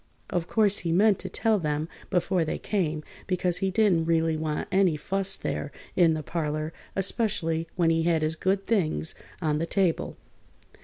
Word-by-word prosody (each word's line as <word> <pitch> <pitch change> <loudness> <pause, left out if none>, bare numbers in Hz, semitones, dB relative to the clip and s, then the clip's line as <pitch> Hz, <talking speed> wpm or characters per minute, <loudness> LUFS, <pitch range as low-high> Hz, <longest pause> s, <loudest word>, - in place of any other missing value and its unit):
Of 175 -1 -1
course 210 -3 +3
he 170 - -2
meant 200 +3 +4
to - - -6
tell 220 -2 +1
them 150 -1 -1 0.2
before 180 -1 +1
they 155 - -2
came, 160 -7 -1 0.2
because 180 -1 +1
he 195 - 0
didn't 190 -5 +3
really 165 -1 +2
want 155 -1 -2
any 185 -4 +3
fuss 195 +4 -1
there 145 - -3 0.2
in 165 -3 +4
the 155 - -4
parlor, 155 +2 -2 0.2
especially 190 -5 0
when 170 -2 +3
he 165 0 +2
had 165 -1 +2
his 155 +1 +1
good 195 +3 0
things 170 -7 0 0.3
on 150 -1 +1
the 165 - -1
table. 185 -4 0
170 Hz, 170 wpm, -27 LUFS, 160-195 Hz, 0.3 s, meant